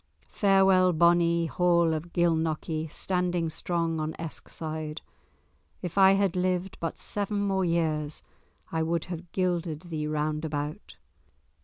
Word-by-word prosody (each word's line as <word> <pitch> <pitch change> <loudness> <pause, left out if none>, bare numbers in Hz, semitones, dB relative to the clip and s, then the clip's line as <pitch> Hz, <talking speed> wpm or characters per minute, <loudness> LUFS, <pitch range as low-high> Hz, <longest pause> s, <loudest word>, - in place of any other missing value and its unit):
Farewell, 190 -2 +4
bonnie 170 0 +4
Hall 170 -1 +2
of 160 +2 -4
Gilnockie, 160 -2 0
standing 180 -3 -1
strong 165 0 -1
on 155 +1 -3
Eskside; 155 -1 -6 0.8
if 175 - -4
I 195 -1 +7
had 195 -2 +1
lived 180 +1 -1
but 165 - -3
seven 205 0 -2
more 190 -1 +1
years, 155 -3 -1 0.5
I 160 - 0
would 165 0 0
have 175 -1 -7
gilded 175 -4 -1
thee 155 -1 -2
round 150 0 -1
about." 150 -1 -4
170 Hz, 125 wpm, -28 LUFS, 160-180 Hz, 0.8 s, I